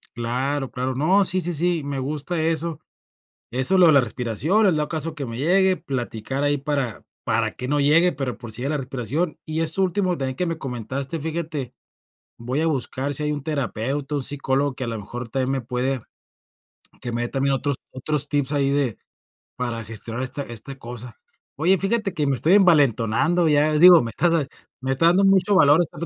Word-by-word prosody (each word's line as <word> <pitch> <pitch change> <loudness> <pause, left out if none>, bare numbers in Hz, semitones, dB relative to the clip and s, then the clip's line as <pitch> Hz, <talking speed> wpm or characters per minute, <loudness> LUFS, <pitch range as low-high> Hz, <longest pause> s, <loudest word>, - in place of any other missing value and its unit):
Claro, 130 +4 -2
claro. 130 +1 -2
No, 170 +10 +3
sí, 185 0 +3
sí, 175 0 -2
sí, 170 0 0
me 140 -1 -3
gusta 150 +5 -2
eso. 160 -1 -1 0.7
Eso, 130 +10 +4
lo 180 - +7
de 160 - +6
la 140 - +6
respiración, 130 - 0
el 185 - +3
dado 150 -1 -1
caso 160 0 -3
que 145 - -5
me 115 -2 -6
llegue, 185 +6 +3
platicar 130 -3 -4
ahí 145 0 +1
para 135 -5 -3 0.2
para 110 0 0
que 125 - -5
no 145 +1 +1
llegue, 160 +5 +4
pero 135 -7 -4
por 120 -2 -10
si 110 - -9
llega 140 - -1
la 150 - 0
respiración. 135 - -3
Y 155 +1 -3
eso 165 +4 +1
último 185 -1 0
también 130 -1 -2
que 180 - -2
me 165 -1 -3
comentaste, 135 +4 -5
fíjate, 155 -5 -4 0.7
voy 125 +5 -3
a 165 - +1
buscar 140 -1 -2
si 150 +2 +3
hay 150 - 0
un 150 - -2
terapeuta, 140 -1 -2
un 140 - -2
psicólogo 140 0 0
que 130 - -5
a - - -4
lo 115 -1 -3
mejor 115 +3 -7
también 130 +2 -1
me 135 -1 -1
puede 125 +2 -2 1.0
que 120 - -4
me 120 +1 -2
dé 120 - -2
también 135 0 0
otros 140 +1 -1 0.2
otros 145 +2 -1
tips 145 -2 0
ahí 140 -2 +1
de 140 -6 0 0.6
para 120 -2 -3
gestionar 115 +3 -4
esta 130 +2 -4
esta 120 +1 -7
cosa. 120 -1 -7 0.4
Oye, 175 +6 +3
fíjate 195 0 -1
que 150 - 0
me 140 - +1
estoy 160 +8 +2
envalentonando, 160 - +3
ya 150 0 +3
digo, 175 +2 +8
me 115 - -4
estás 170 +9 +1 0.5
me 135 0 -2
está 135 +5 +1
dando 185 +4 +4
mucho 195 +1 +3
valor, 150 -5 +6
estando 170 0 -7
140 Hz, 200 wpm, -23 LUFS, 125-165 Hz, 1.0 s, digo